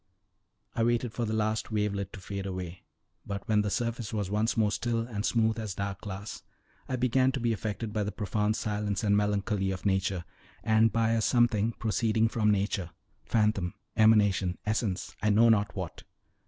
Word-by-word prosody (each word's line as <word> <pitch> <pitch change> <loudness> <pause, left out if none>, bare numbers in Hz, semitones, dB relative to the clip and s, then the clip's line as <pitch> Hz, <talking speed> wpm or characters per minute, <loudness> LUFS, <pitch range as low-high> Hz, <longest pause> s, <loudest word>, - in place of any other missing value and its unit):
I - - -1
waited 120 0 +1
for 120 - -1
the 110 - -2
last 110 0 0
wavelet 100 -2 -1
to 110 - -8
fade 100 +1 -5
away, 90 -2 -5 0.4
but 100 -1 -6
when 105 -1 +3
the 105 - -1
surface 115 0 -2
was 105 -3 -2
once 110 +3 +1
more 105 -2 +3
still 115 +2 -1
and 115 -3 -4
smooth 110 -1 +2
as 105 -4 -4
dark 100 0 -4
glass, 100 +1 -6 0.5
I 130 - 0
began 130 +1 +2
to 135 - -1
be 120 -1 +1
affected 110 +1 -4
by 105 - 0
the 105 - -3
profounded 105 +1 -1
silence 105 -2 -2
and 100 -1 +3
melancholy 105 -1 0
of 95 0 -4
nature, 95 -2 0 0.4
and 110 0 +4
by 115 -1 +2
a 115 -1 +2
something 115 -1 +2
proceeding 110 0 +1
from 110 -2 +1
nature 100 -3 0 0.4
phantom, 105 -5 +1 0.2
emanation, 100 -4 +4
essence, 105 -3 -2
I 105 - +2
know 110 +3 +5
not 105 -2 +2
what. 95 -5 -5
105 Hz, 180 wpm, -29 LUFS, 100-115 Hz, 0.5 s, know